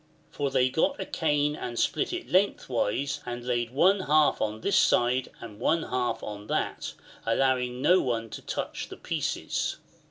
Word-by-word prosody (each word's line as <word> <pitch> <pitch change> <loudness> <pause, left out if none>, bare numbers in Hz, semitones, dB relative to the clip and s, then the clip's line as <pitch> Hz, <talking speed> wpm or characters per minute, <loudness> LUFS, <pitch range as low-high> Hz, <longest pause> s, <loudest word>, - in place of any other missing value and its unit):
For 145 -1 -1
they 130 -1 +3
got 160 - +1
a - - -3
cane 150 -2 +1
and 120 -4 -5
split 390 - +1
it 360 0 -4
lengthwise, 140 - +1
and 120 0 -6
laid 120 -1 0
one 185 +10 +4
half 155 -4 +3
on 110 0 -2
this 200 - +1
side 125 -6 +3
and 110 -3 -10
one 160 +6 +2
half 125 -1 -2
on 105 0 -7
that, - - -2 0.3
allowing 125 +1 +1
no 180 +4 +5
one 115 -3 -2
to - - -7
touch - - -4
the - - -9
pieces. - - -2
130 Hz, 165 wpm, -28 LUFS, 120-155 Hz, 0.3 s, no